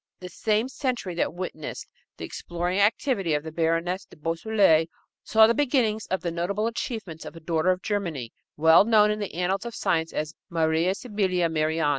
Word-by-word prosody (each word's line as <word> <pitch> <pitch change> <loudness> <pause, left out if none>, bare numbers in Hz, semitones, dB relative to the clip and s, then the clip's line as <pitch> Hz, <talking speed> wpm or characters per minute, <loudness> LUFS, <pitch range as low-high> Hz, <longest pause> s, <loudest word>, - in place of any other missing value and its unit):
The 180 - -8
same 215 +6 0
century 250 -8 -3
that 170 - 0
witnessed 175 -4 -6 0.3
the - - -5
exploring 175 +2 -3
activity 200 - +2
of 150 - -2
the 160 - -7
Baroness 165 +3 0
de - - -17
Beausoleil 165 +1 +2 0.4
saw 220 0 +6
the 230 - +3
beginnings 245 -6 +1
of 190 - -1
the 170 - -2
notable 190 +6 -1
achievements 220 -7 -4
of - - -9
a - - -9
daughter 165 +2 0
of 185 0 0
Germany, 170 - -3 0.2
well 160 +4 +7
known 210 -1 +4
in 210 - -2
the 205 -5 -5
annals 185 +2 0
of 235 -1 -6
science 160 -1 0
as 155 +1 -3 0.2
Maria 165 +2 +1
Sibylla 190 -7 0
Merian. 155 -1 +1
180 Hz, 180 wpm, -26 LUFS, 165-210 Hz, 0.4 s, well